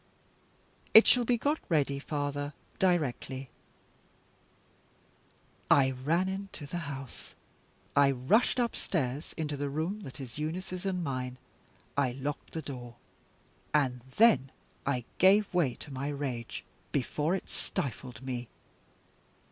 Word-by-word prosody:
"It 220 - +12
shall 245 -1 +5
be 240 +1 +3
got 290 +6 +1
ready, 140 -4 +2
father, 145 0 -2 0.3
directly." 135 -7 0 2.2
I 135 -2 +6
ran 155 +8 +1
into 190 -5 -5
the 175 +5 -4
house; 135 -3 -8 0.6
I 140 -1 +6
rushed 140 - +3
upstairs 155 - -1
into 150 -2 -2
the 140 0 -2
room 160 +9 -2
that 155 -8 -8
is 130 0 -7
Eunice's 180 +4 -3
and 180 -2 -1
mine; 130 -3 -3 0.6
I 135 -3 +2
locked 140 +3 -5
the 160 - -3
door, 120 -4 -7 0.8
and 130 -4 +2 0.2
then 215 - +6 0.4
I 125 -4 0
gave 195 +2 +5
way 150 -9 +2
to 145 - -8
my 135 +2 -3
rage, 135 -5 -3 0.3
before 150 +5 +1
it 195 - -6
stifled 125 -3 -4
me. 125 -2 -3
145 Hz, 120 wpm, -31 LUFS, 130-180 Hz, 2.2 s, It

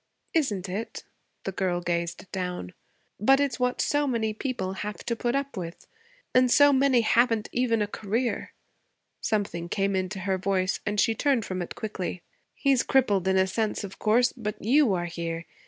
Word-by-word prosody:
'Isn't 210 - 0
it?' 200 +5 -5 0.4
The 195 - -3
girl 185 -2 -1
gazed 170 0 -2
down. 180 - -4 0.5
'But 270 +7 +5
it's 275 -4 0
what 250 0 0
so 290 0 +1
many 225 -4 0
people 215 -6 -3
have 205 +2 -6
to 235 - 0
put 240 +2 -1
up 280 -1 -2
with. 170 -3 -6 0.5
And 255 0 +5
so 285 +3 +6
many 265 -2 +4
haven't 225 -1 +2
even 230 -3 +1
a - - -2
career.' 220 +4 -2 0.7
Something 175 -5 -1
came 195 +1 0
into 190 +1 -2
her 190 0 0
voice 190 0 0
and 210 0 0
she 225 +3 +3
turned 255 -1 +1
from 185 -1 -3
it 175 - -6
quickly. 190 -4 -4 0.3
'He's 270 -3 +3
crippled, 205 -8 +2
in 190 0 +3
a 190 - +4
sense, 210 +3 -1
of 195 -1 -8
course. 240 +3 +3
But 210 -4 -5
you 265 +2 +4
are 175 -1 -2
here. 165 -1 -4
210 Hz, 175 wpm, -27 LUFS, 185-245 Hz, 0.7 s, so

